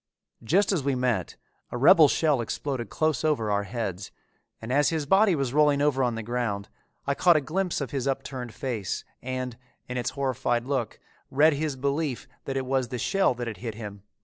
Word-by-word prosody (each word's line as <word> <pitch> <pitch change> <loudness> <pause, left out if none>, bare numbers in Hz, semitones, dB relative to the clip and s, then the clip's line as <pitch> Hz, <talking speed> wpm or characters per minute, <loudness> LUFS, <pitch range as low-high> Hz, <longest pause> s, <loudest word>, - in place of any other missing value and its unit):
Just 190 - +3
as 185 -6 +1
we 135 0 0
met, 125 -2 -1 0.3
a - - -4
rebel 155 +4 +7
shell 150 -4 +2
exploded 120 -1 -3
close 155 -3 0
over 135 -9 +1
our 100 0 +1
heads 100 -3 -4 0.5
and 115 +3 -4
as 145 +1 +4
his 160 -3 -1
body 195 +4 +4
was 135 -4 -1
rolling 150 -1 +4
over 145 -2 +2
on 120 -2 +1
the 115 - -4
ground, 115 -4 -2 0.4
I 140 - +1
caught 175 +4 +5
a - - +5
glimpse 175 +4 -2
of 135 - -4
his 135 -1 -2
upturned 135 -3 -3
face 115 -7 -4 0.2
and, 130 -1 -4 0.3
in 125 - -4
its 120 0 -1
horrified 130 -3 -1
look, 130 -4 -2 0.3
read 150 +4 +5
his 150 0 -2
belief 140 0 -2 0.2
that 135 -1 -2
it 130 - -2
was 130 -1 0
the 125 - -4
shell 195 - +2
that 120 0 -4
had 110 -3 -5
hit 115 -2 -5
him. 105 -3 -8
130 Hz, 200 wpm, -27 LUFS, 120-145 Hz, 0.5 s, rebel